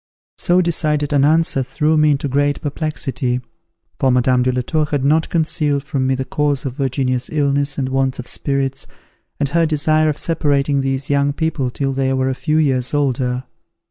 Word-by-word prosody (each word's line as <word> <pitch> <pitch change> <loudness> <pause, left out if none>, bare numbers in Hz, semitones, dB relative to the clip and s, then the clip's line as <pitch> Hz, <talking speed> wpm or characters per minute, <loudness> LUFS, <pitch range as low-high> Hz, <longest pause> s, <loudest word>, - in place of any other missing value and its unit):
So 180 -1 +3
decided 150 -4 0
an 140 -1 +3
answer 155 -2 +3
threw 150 +5 0
me 150 0 +4
into 145 0 +1
great 145 +1 +1
perplexity, 135 -4 -2 0.6
for 135 - +2
Madame 125 0 +3
de 130 +1 +2
la 125 0 -1
Tour 155 +4 0
had 145 -2 -2
not 155 +3 +2
concealed 150 -4 0
from 135 -2 -1
me 130 - +2
the 130 0 -3
cause 145 -1 -1
of 130 - -3
Virginia's 130 -2 -1
illness 140 -1 0
and 135 -2 -1
want 135 0 0
of 125 - -6
spirits, 135 0 -2 0.5
and 145 -2 0
her 165 +2 +2
desire 155 0 +2
of 150 - -2
separating 145 -3 0
these 135 +1 -2
young 140 0 +2
people 150 -4 -1
till 135 +2 -2
they 135 0 0
were 130 0 0
a - - 0
few 155 +4 -1
years 135 -3 +1
older. 130 -3 0
140 Hz, 185 wpm, -19 LUFS, 130-150 Hz, 0.6 s, me